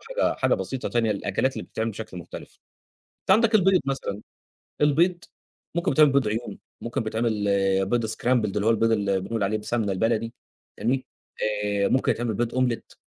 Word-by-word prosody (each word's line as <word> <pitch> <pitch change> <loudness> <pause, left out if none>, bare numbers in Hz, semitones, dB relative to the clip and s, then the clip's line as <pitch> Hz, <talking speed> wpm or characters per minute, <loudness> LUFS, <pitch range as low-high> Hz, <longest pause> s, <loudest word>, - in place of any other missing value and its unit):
حاجة - - 0
حاجة - - +2
بسيطة 130 -2 -4
تانية 115 -3 +1
للأكلات 100 +6 -1
اللي - - -6
بتتعمل 110 +1 -3
بشكل 105 -3 -8
مختلف. 85 - -10 0.6
أنت - - -5
عندك 225 +3 +4
البيض 190 -3 +5
مثلًا، 135 -7 -3 0.6
البيض 170 +5 +3 0.5
ممكن 170 - +1
بيتعمل 150 0 +5
بيض 135 -5 +2
عيون، 110 +3 -3 0.2
ممكن 120 +2 -3
بتعمل 110 -2 -1
آآ 95 -1 +2
بيض 115 +3 0
scrambled، 110 -2 +1
اللي 105 - 0
هو 115 - +4
البيض 115 0 +3
اللي 100 -3 +1
بنقول 110 +3 -3
عليه 105 +2 0
بالسمنة 105 -1 -1
البلدي، 115 +4 0 0.4
فاهمني، 130 +3 0 0.6
آآ 100 -1 +1
ممكن 130 - +2
يتعمل 120 -2 -2
بيض 115 +3 -2
أومليت 125 -2 -1
115 Hz, 170 wpm, -25 LUFS, 105-130 Hz, 0.6 s, البيض